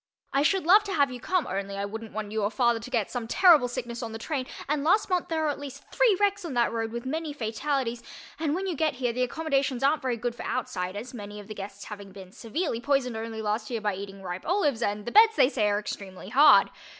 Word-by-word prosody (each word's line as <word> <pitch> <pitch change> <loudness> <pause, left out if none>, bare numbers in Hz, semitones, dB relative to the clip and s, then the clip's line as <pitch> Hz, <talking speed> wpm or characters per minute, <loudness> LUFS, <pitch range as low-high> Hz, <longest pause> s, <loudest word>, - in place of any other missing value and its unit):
I 275 - +3
should 370 +4 +2
love 400 +5 +7
to 395 - -3
have 285 -5 +2
you 250 - -7
come 365 +5 0
only 195 +1 -4
I 200 - -2
wouldn't 225 +2 -7
want 210 -1 -5
you 220 0 -1
or 205 - +1
father 235 -1 +2
to 230 - -9
get 230 -6 -1
some 240 -3 -4
terrible 330 -3 +6
sickness 240 -1 -5
on 225 -2 -5
the - - -4
train 260 +2 -3 0.2
and 290 0 0
last 385 +5 +2
month 360 -1 +1
there 320 -1 -1
were 310 - +1
at 290 - -3
least 280 -1 -8
three - - +3
wrecks 405 -1 +1
on 320 -7 -5
that 235 -1 +2
road, 225 -1 -2
with 235 +2 -5
many 310 +2 -3
fatalities, 240 0 -2 0.4
and 310 -1 0
when 380 +2 -2
you 365 -3 -2
get 310 -1 0
here 245 -2 -1
the 250 - -2
accommodations 275 -1 0
aren't 290 +3 +3
very 255 -3 -1
good 240 +1 -2
for - - -8
outsiders, 205 -1 -4
many 205 -2 -8
of 205 - -10
the 215 - -6
guests 200 0 -8
having 200 -2 -9
been 190 -1 -11
severely 235 - -3
poisoned 260 -3 +1
only 220 0 -5
last 215 +1 -2
year 235 -2 -2
by 210 -1 -1
eating 195 0 -8
ripe 180 0 -5
olives 300 - +1
and 205 -1 -1
the 240 - -4
beds, 440 +1 +7
they 255 - +5
say, 220 -7 +1
are 205 - +1
extremely 195 -2 -7
hard. 285 +6 +6
245 Hz, 255 wpm, -27 LUFS, 215-295 Hz, 0.4 s, love